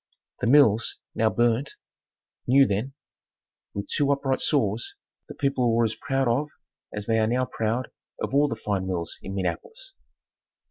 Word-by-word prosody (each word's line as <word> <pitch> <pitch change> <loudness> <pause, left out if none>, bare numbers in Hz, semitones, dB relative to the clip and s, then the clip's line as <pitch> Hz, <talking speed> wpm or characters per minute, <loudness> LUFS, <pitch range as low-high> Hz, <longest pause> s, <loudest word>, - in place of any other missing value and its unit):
The - - 0
mills 115 -5 +4 0.2
(now 110 0 +2
burned) 120 +5 +1 0.7
new 135 +2 +6
then, 110 +5 -2 0.8
with 100 - -4
two 145 -1 +1
upright 140 -1 0
saws, 115 -6 0 0.3
the - - -9
people 130 -4 +1
were 115 - +3
as 110 - -1
proud 135 0 -1
of 135 +6 +1 0.4
as 105 0 -5
they 110 0 +2
are 110 - +2
now 125 +3 +1
proud 115 +2 -2 0.3
of - - -3
all 145 +1 +4
the - - -3
fine 95 -3 -2
mills 85 -3 -3
in 95 - -6
Minneapolis. 450 - -4
120 Hz, 155 wpm, -26 LUFS, 105-135 Hz, 0.8 s, new